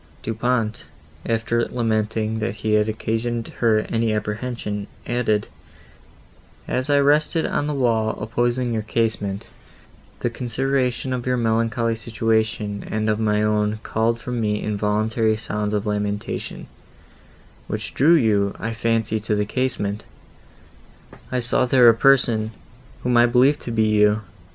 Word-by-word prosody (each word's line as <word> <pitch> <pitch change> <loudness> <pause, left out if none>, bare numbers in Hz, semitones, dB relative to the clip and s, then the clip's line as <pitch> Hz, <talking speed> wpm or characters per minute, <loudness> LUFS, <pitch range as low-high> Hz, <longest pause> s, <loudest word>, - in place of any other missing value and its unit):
Du 115 - -2
Pont, 115 -1 -1 0.4
after 115 +1 0
lamenting, 110 -1 -1
that 110 -1 -2
he 110 0 -1
had 105 0 +3
occasioned 115 +2 -2
her 110 -2 +3
any 115 0 -1
apprehension, 105 -1 -3 0.2
added, 115 -4 0 1.2
"As 130 +2 -2
I 145 - +4
rested 150 +3 +3
on 145 - -1
the 150 - -2
wall, 115 -4 +1
opposite 120 +2 0
to 120 - -2
your 110 -1 -1
casement, 105 -2 -2 0.7
the 120 - 0
consideration 130 +1 -1
of 125 -1 -4
your 125 0 +1
melancholy 115 0 +1
situation 110 -2 -1
and 110 0 0
of 105 - -1
my 105 -1 +1
own 105 0 +1
called 115 +1 0
from 125 0 -3
me 105 -1 0
involuntary 110 +2 0
sounds 105 -1 -3
of 105 0 -1
lamentation, 105 0 -3 1.0
which - - -4
drew 160 +6 +5
you, 105 -8 +2
I 115 +2 -3
fancy, 115 -1 0
to 105 0 -1
the 105 0 0
casement; 110 -3 -1 1.3
I 130 - 0
saw 120 +2 +1
there 125 -1 +6
a - - +7
person, 115 -3 +3 0.5
whom 125 -1 +2
I 120 0 +6
believed 130 +4 +4
to 120 - -5
be 110 -1 +2
you. 105 +1 +4
115 Hz, 140 wpm, -22 LUFS, 105-120 Hz, 1.3 s, a